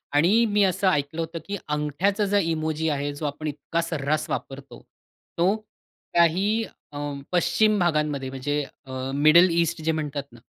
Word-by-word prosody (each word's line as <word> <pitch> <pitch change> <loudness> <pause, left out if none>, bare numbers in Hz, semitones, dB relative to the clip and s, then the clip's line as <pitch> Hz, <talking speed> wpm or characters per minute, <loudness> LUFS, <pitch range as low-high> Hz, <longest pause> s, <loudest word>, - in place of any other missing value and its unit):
आणि 200 +10 +4
मी 205 0 +3
असं 190 +1 +1
ऐकलं 160 -1 0
होतं, 165 +1 -4
की 200 0 -3
अंगठ्याचा 150 +8 0
जो 205 +1 +2
इमोजी 160 -3 0
आहे 145 0 -2
जो 145 +2 -6
आपण 150 +2 -4
इतका 150 +3 -2
सर्रास 155 -2 -2
वापरतो, 135 0 -6 0.6
तो 185 +5 +3 0.6
काही 190 +7 +3 0.3
अ, 145 - -6 0.3
पश्चिम 215 +4 +3
भागांमध्ये 150 -5 0
म्हणजे 145 +2 -2 0.2
अ, 130 - -11 0.2
मिडल 155 +5 +6
ईस्ट 170 -1 0
जे 160 - +2
म्हणतात 150 -3 -3
ना, 120 - -15
160 Hz, 155 wpm, -25 LUFS, 145-180 Hz, 0.6 s, मिडल